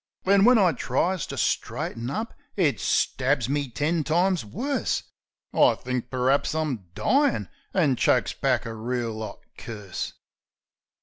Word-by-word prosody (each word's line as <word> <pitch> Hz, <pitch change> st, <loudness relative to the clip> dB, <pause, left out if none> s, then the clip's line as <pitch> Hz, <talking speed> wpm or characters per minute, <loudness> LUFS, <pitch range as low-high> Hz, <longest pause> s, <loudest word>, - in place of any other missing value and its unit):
Then, 195 Hz, +1 st, +5 dB
when 250 Hz, 0 st, +7 dB
I 190 Hz, -5 st, +5 dB
tries 180 Hz, +1 st, -1 dB
to -, -, -6 dB
straighten 115 Hz, +1 st, -1 dB
up, 220 Hz, +9 st, -3 dB, 0.2 s
it 165 Hz, -8 st, +2 dB
stabs 130 Hz, -1 st, +1 dB
me 140 Hz, 0 st, -1 dB
ten 150 Hz, +6 st, 0 dB
times 175 Hz, +2 st, +2 dB
worse. 255 Hz, -, -2 dB, 0.5 s
I -, -, +5 dB
thinks 125 Hz, -1 st, -3 dB
per'aps 130 Hz, +4 st, +1 dB
I'm 135 Hz, -, -2 dB
dyin', 255 Hz, -, +2 dB, 0.2 s
an' 150 Hz, -9 st, +2 dB
chokes -, -, +2 dB
back -, -, 0 dB
a 115 Hz, -, -4 dB
reel 115 Hz, -1 st, -3 dB
'ot 110 Hz, -2 st, -7 dB, 0.2 s
curse. 105 Hz, -5 st, -6 dB
140 Hz, 135 wpm, -26 LUFS, 120-185 Hz, 0.5 s, when